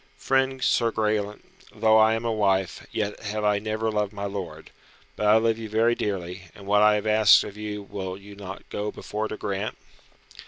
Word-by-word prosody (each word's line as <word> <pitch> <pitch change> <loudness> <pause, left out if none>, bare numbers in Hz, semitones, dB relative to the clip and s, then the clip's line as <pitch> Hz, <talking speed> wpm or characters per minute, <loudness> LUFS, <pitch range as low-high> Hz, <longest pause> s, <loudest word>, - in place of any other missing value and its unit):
"Friend, 135 -1 0
Sir 115 -1 +2
Graelent, 105 -1 -1 0.3
though 110 0 +4
I 110 +1 +5
am 115 +1 -4
a 115 - 0
wife, 95 -4 0
yet 105 -1 -2
have 105 0 -4
I 105 -1 +2
never 110 +1 -2
loved 105 -1 -1
my 100 0 -5
lord. 95 -6 -6 0.4
But 105 - -1
I 105 +1 +7
love 115 0 +1
you 110 -1 -6
very 115 +2 +3
dearly, 95 -4 -4
and 100 - -12
what 105 +1 +3
I 105 0 +6
have 105 0 -2
asked 110 -1 +6
of 100 - -8
you 105 -1 -5
will 95 -2 -6
you 100 +1 -13
not 100 -1 -9
go 105 0 -3
before 105 +1 -4
to 110 - -6
grant?" 100 +1 -3
105 Hz, 200 wpm, -25 LUFS, 100-110 Hz, 0.4 s, I